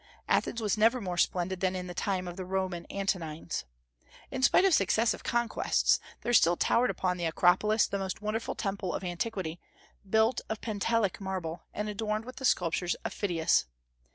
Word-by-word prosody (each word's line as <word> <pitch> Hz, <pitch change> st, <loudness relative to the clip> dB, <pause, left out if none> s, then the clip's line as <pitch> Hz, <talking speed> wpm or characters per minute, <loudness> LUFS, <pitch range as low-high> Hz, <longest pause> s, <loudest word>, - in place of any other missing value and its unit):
Athens 230 Hz, -, +1 dB
was 215 Hz, -1 st, 0 dB
never 230 Hz, +4 st, +4 dB
more 185 Hz, -5 st, -3 dB
splendid 180 Hz, +1 st, 0 dB
than 185 Hz, 0 st, 0 dB
in 180 Hz, -1 st, -4 dB
the 180 Hz, -, -6 dB
time 185 Hz, 0 st, -1 dB
of 175 Hz, -, -6 dB
the 185 Hz, -, -5 dB
Roman 185 Hz, -2 st, -3 dB
Antonines. 175 Hz, -, -3 dB, 0.7 s
In 265 Hz, -, -3 dB
spite 265 Hz, +8 st, +5 dB
of 385 Hz, -, +4 dB
successive 220 Hz, -, +2 dB
conquests, 235 Hz, 0 st, +2 dB, 0.2 s
there 240 Hz, -, -1 dB
still 175 Hz, -6 st, +5 dB
towered 245 Hz, +2 st, +3 dB
upon 180 Hz, -1 st, -1 dB
the 175 Hz, -, -2 dB
Acropolis 180 Hz, +6 st, +3 dB
the 200 Hz, -, -3 dB
most 190 Hz, -1 st, -3 dB
wonderful 215 Hz, +2 st, -3 dB
temple 195 Hz, -3 st, -2 dB
of -, -, -4 dB
antiquity, 175 Hz, -2 st, -3 dB, 0.5 s
built 220 Hz, +3 st, +3 dB
of 220 Hz, 0 st, -3 dB
Pentelic 215 Hz, -2 st, 0 dB
marble, 180 Hz, -4 st, -4 dB
and 210 Hz, -, -3 dB
adorned 215 Hz, +1 st, -2 dB
with 255 Hz, +1 st, -9 dB
the 265 Hz, -, -4 dB
sculptures 175 Hz, -4 st, +1 dB
of -, -, -2 dB
Phidias. 170 Hz, -, +1 dB
195 Hz, 175 wpm, -30 LUFS, 180-220 Hz, 0.7 s, spite